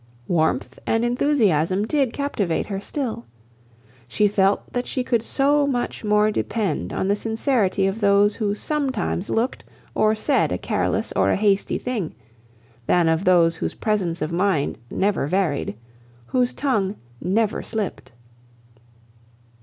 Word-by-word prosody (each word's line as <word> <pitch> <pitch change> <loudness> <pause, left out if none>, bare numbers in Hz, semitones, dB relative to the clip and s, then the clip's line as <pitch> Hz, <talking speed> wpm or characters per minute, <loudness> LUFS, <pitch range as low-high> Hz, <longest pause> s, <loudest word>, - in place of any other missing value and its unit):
Warmth 155 -6 0
and 225 +1 +2
enthusiasm 210 - +2
did 275 -1 +1
captivate 225 - -1
her 195 -2 -4
still. 225 - -4 0.8
She 210 +11 +3
felt 200 -1 +2
that 245 0 -2
she 255 - -2
could 235 -2 +1
so 285 +4 +2
much 245 -4 -2
more 210 0 +3
depend 215 0 -2
upon 190 - -1
the 200 - +3
sincerity 220 -3 0
of 195 +4 -2
those 200 +1 +4
who 205 -2 0
sometimes 260 - -2
looked 235 +4 -1 0.3
or 215 0 +3
said 250 - +1
a 90 - 0
careless - - -1
or 95 0 +3
a - - +3
hasty 200 -1 +1
thing, 225 -10 -3 0.7
than 175 -2 +3
of 160 +3 +1
those 170 -2 +4
whose - - -3
presence 185 -7 -1
of 155 - -3
mind 175 -4 0
never 195 -7 0
varied, 155 - 0 0.5
whose 250 - +1
tongue 215 -8 0 0.3
never 210 +3 0
slipped. 220 -4 -4
205 Hz, 140 wpm, -23 LUFS, 185-240 Hz, 0.8 s, those